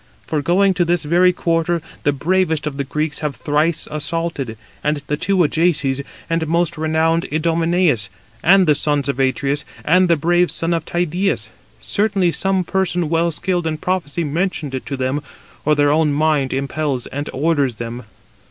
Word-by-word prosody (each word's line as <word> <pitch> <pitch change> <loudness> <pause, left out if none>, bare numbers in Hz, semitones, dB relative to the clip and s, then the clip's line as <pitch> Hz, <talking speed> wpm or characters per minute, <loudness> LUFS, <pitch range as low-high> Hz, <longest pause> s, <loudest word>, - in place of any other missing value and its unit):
For 155 -2 -1
going 190 +6 +3
to 180 - +1
this 175 0 0
very 175 +4 +4
quarter, 170 -1 0 0.2
the 145 - +2
bravest 160 +2 0
[of 145 -2 -4
the 140 - -1
Greeks] 150 +2 -2
have 150 -3 -3
thrice 150 +5 0
assaulted, 150 -6 -3 0.3
the 150 -1 -1
two 185 +5 0
Ajaces, 150 -4 +1 0.3
and 165 -1 -1
most 170 +1 +1
renowned 160 +1 +1
Idomeneus, 165 - +1 0.3
and 190 +1 +5
the 155 - +5
sons 145 -1 0
of 140 - -2
Atreus, 135 +2 0 0.2
and 180 +3 +4
the 170 - +5
brave 175 +3 +2
son 165 +1 -1
of 165 -1 -2
Tydeus. 175 +3 -1 0.3
Certainly 200 -4 +1
some 190 +1 0
person 180 -2 -1
well 165 +1 +2
skilled 175 +2 -1
in 155 -1 -2
prophecy 170 -2 -2
mentioned 160 -2 -2
it 130 -3 -5
to 140 +1 -3
them, 130 +3 -1 0.4
or 150 0 +4
their 145 0 +3
own 155 0 +3
mind 150 -3 +1
impels 140 -1 -2
and 145 +2 -5
orders 140 -4 +1
them." 120 +1 -6
160 Hz, 165 wpm, -19 LUFS, 145-175 Hz, 0.4 s, and